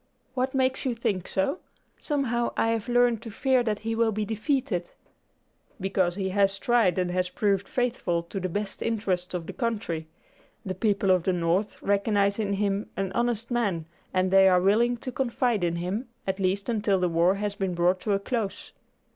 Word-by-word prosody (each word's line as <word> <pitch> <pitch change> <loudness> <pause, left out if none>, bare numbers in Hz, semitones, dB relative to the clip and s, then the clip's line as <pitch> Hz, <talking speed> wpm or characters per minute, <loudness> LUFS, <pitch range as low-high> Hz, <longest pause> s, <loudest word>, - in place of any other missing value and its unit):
"What 260 +1 -1
makes 260 0 +1
you 255 -4 -1
think 210 -6 -2
so? 190 - 0 0.4
Somehow 245 -5 -1
I 225 - +2
have 225 +1 -1
learned 245 -2 +3
to 230 - -8
fear 255 +4 +2
that 215 -3 -1
he 225 - 0
will 225 0 +2
be 215 0 -2
defeated." 220 - -1 0.9
"Because 185 -2 0
he 190 -1 -2
has 195 0 +2
been - - -18
tried, 230 -8 +3
and 180 -1 0
has 180 0 0
proved 200 0 0
faithful 230 -9 -1
to 180 +4 -5
the 185 0 -2
best 205 +3 -4
interests 190 -6 -1
of 170 -2 -3
the - - -7
country. 210 -10 -2 0.6
The 190 - -2
people 200 0 +1
of 185 -1 +4
the 185 +2 0
North 175 +4 0
recognize 200 0 +2
in 200 -2 0
him 200 +1 -1
an 195 -1 -1
honest 235 +1 -1
man, 200 -9 0 0.3
and 185 0 +1
they 195 0 +7
are 180 -1 +5
willing 225 +6 +3
to 255 - -6
confide 245 -4 0
in 170 -1 +1
him, 190 +8 -3 0.2
at 190 0 -2
least 195 +1 0
until 210 -4 +1
the 180 - +2
war 170 +3 +3
has 205 0 -2
been 195 -3 -2
brought 175 +2 +2
to 205 +2 -1
a 195 - +2
close. 215 -1 -3
200 Hz, 195 wpm, -27 LUFS, 185-230 Hz, 0.9 s, they